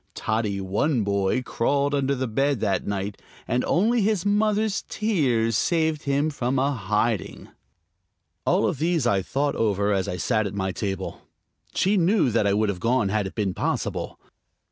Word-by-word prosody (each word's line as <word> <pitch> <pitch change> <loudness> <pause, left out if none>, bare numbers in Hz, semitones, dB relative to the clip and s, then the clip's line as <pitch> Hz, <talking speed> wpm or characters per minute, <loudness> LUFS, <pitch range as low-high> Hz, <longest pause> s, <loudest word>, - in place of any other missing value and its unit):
Toddy 110 -2 -1
One 105 +7 0
Boy 100 +4 0
crawled 140 +4 0
under 140 -1 +1
the 130 0 -2
bed 135 +3 0
that 100 -4 -1
night, 100 0 -3 0.3
and 125 - 0
only 225 +6 +2
his 205 -3 +1
mother's 210 0 +1
tears 130 - +1
saved 160 - +1
him 140 +2 +1
from 130 -1 -1
a 135 +2 +2
hiding. 105 -1 -1 0.9
All - - +2
these 160 -1 0
I 100 -5 +2
thought 140 +8 -1
over 105 -2 +1
as 95 -2 0
I 90 - -3
sat 110 +3 0
at 100 - -7
my 95 -1 -1
table. 95 0 -4 0.5
She 200 +2 +2
knew 180 - +3
that 110 -2 +2
I 100 - +2
would 105 0 +1
have 95 -3 -3
gone 115 0 +1
had 105 -1 0
it - - -10
been 100 -4 -1
possible. - - -3
120 Hz, 165 wpm, -24 LUFS, 100-150 Hz, 0.9 s, knew